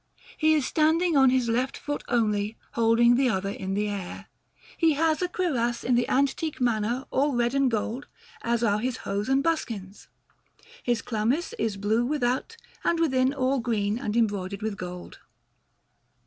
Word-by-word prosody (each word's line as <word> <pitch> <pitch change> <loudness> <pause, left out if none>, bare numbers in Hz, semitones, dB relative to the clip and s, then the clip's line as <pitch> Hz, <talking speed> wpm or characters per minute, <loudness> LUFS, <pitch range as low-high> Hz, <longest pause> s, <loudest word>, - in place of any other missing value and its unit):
He 315 0 +3
is 295 -4 +1
standing 320 +3 +2
on 265 -2 +6
his 255 -1 +1
left 250 +3 0
foot 290 0 -4
only, 215 -2 0
holding 235 +1 +4
the 255 +1 +3
other 195 -2 -1
in 195 -1 -4
the 210 +1 0
air. 200 -3 -6 0.5
He 325 -2 +3
has 315 +2 +1
a 360 - +1
cuirass 255 -11 -1
in 250 - +1
the 245 0 +2
antique 280 +3 0
manner, 240 +1 0
all 280 0 +1
red 240 +1 +1
and 275 -1 +3
gold, 230 +4 -3 0.3
as 235 0 0
are 210 -2 +2
his 245 +1 -2
hose 200 +4 -2
and 270 +1 +2
his 330 - +5
buskins. 205 -10 -8 0.7
His 240 -2 -1
chlamys 240 +9 -1
is 215 -3 -1
blue 215 +4 +1
without, 265 - -1 0.3
and 340 - +1
within 265 -5 +2
all 270 -1 0
green 220 -2 -1
and 225 -4 -2
embroidered 200 -3 -1
with 220 -2 -2
gold. 180 -2 -8
240 Hz, 170 wpm, -26 LUFS, 215-275 Hz, 0.7 s, on